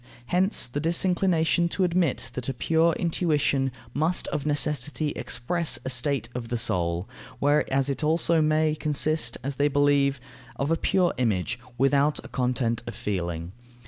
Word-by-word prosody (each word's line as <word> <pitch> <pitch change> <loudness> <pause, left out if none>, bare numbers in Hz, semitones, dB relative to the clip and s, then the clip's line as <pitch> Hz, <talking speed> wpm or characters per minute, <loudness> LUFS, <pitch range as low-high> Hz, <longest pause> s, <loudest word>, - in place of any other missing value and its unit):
Hence 185 - +2
the 125 +4 -4
disinclination 170 0 +2
to 190 - 0
admit 175 -5 0
that 125 +1 -4
a 135 - -3
pure 165 +5 +2
intuition 150 -6 0 0.2
must 160 +5 0
of 150 - -3
necessity 150 -1 0
express 155 +6 -1
a 130 - -1
state 130 -1 +1
of 120 -2 -5
the 120 - -1
soul, 90 -5 0 0.3
whereas 140 -1 +1
it 140 +1 -2
may 150 - +1
also 165 +1 +2 0.4
consist, 150 -4 +1
as 135 0 -4
they 145 - +3
believe, 140 -1 +2 0.4
of 140 +5 -2
a - - +4
pure 180 +1 +1
image, 115 0 0 0.2
without 140 +3 +2
a - - -10
content 125 -2 -1
of 120 - -6
feeling. 85 -4 -3
145 Hz, 150 wpm, -26 LUFS, 125-160 Hz, 0.4 s, a